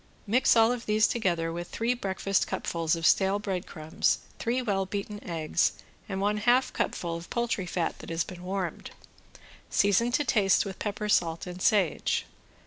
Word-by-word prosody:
Mix 235 Hz, +5 st, +4 dB
all 225 Hz, 0 st, +5 dB
of 245 Hz, -1 st, -4 dB
these 215 Hz, +1 st, +4 dB
together 170 Hz, -7 st, 0 dB
with 175 Hz, +1 st, -5 dB
three 230 Hz, +2 st, 0 dB
breakfast 195 Hz, -4 st, -1 dB
cupfuls 165 Hz, -1 st, -1 dB
of 165 Hz, 0 st, -3 dB
stale 190 Hz, +3 st, +4 dB
breadcrumbs, 180 Hz, -6 st, -1 dB, 0.2 s
three 240 Hz, +2 st, 0 dB
well 195 Hz, -6 st, -1 dB
beaten 205 Hz, +1 st, -5 dB
eggs 165 Hz, -1 st, 0 dB, 0.4 s
and 190 Hz, -1 st, -3 dB
one 205 Hz, +2 st, +1 dB
half 245 Hz, +4 st, +3 dB
cupful 170 Hz, -1 st, -2 dB
of 170 Hz, +1 st, -8 dB
poultry 235 Hz, -6 st, -1 dB
fat 170 Hz, 0 st, -2 dB
that -, -, -10 dB
has 165 Hz, 0 st, 0 dB
been 180 Hz, -1 st, -10 dB
warmed; 185 Hz, -1 st, -4 dB, 0.8 s
season 205 Hz, +4 st, +3 dB
to 295 Hz, -, +2 dB
taste 200 Hz, -6 st, +3 dB
with 195 Hz, -1 st, -7 dB
pepper, 210 Hz, 0 st, -3 dB
salt 170 Hz, -5 st, +1 dB
and 180 Hz, 0 st, -8 dB
sage. 195 Hz, -5 st, +2 dB
195 Hz, 165 wpm, -28 LUFS, 175-215 Hz, 0.8 s, all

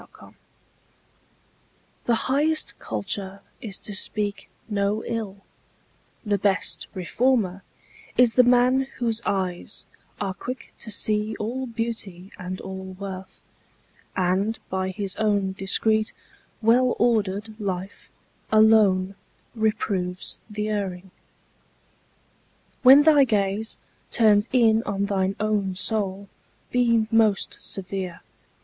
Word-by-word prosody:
TRUE -, -, -16 dB
CULTURE -, -, -16 dB, 1.7 s
The 235 Hz, -, +3 dB
highest 295 Hz, +6 st, 0 dB
culture 190 Hz, -, -4 dB, 0.2 s
is 210 Hz, -6 st, -6 dB
to 205 Hz, -, -7 dB
speak 205 Hz, +1 st, -2 dB, 0.2 s
no 205 Hz, 0 st, 0 dB
ill, 210 Hz, -4 st, -4 dB, 0.8 s
The 205 Hz, -1 st, +1 dB
best 195 Hz, -2 st, 0 dB
reformer 195 Hz, 0 st, +1 dB, 0.6 s
is 245 Hz, -2 st, +5 dB
the 250 Hz, -, +7 dB
man 250 Hz, +2 st, +4 dB
whose 230 Hz, -2 st, -1 dB
eyes 185 Hz, -3 st, -2 dB, 0.3 s
Are 195 Hz, -2 st, -2 dB
quick 240 Hz, +6 st, -7 dB
to 225 Hz, -, -8 dB
see 215 Hz, +1 st, -1 dB
all 255 Hz, +5 st, -3 dB
beauty 220 Hz, -5 st, -5 dB
and 185 Hz, 0 st, -5 dB
all 190 Hz, 0 st, -7 dB
worth; 190 Hz, -1 st, -7 dB, 0.7 s
And 190 Hz, +4 st, +1 dB
by 190 Hz, 0 st, -1 dB
his 195 Hz, 0 st, -2 dB
own 205 Hz, -3 st, +1 dB
discreet, 215 Hz, +3 st, +1 dB, 0.5 s
well 245 Hz, +3 st, +4 dB
ordered 215 Hz, -2 st, +1 dB
life, 190 Hz, -1 st, -5 dB, 0.4 s
Alone 215 Hz, -4 st, +5 dB, 0.4 s
reproves 200 Hz, -5 st, -1 dB
the 210 Hz, 0 st, -3 dB
erring. 190 Hz, -3 st, -3 dB, 1.7 s
When 270 Hz, +2 st, +9 dB
thy 300 Hz, -2 st, +7 dB
gaze 210 Hz, -2 st, 0 dB, 0.3 s
Turns 210 Hz, -1 st, +4 dB
in 225 Hz, -3 st, +4 dB
on 200 Hz, -2 st, -1 dB
thine 195 Hz, -1 st, 0 dB
own 210 Hz, -3 st, 0 dB
soul, 200 Hz, 0 st, -1 dB, 0.4 s
be 235 Hz, -3 st, +3 dB
most 220 Hz, -3 st, +2 dB
severe. 185 Hz, -2 st, -4 dB
210 Hz, 105 wpm, -24 LUFS, 190-225 Hz, 1.7 s, When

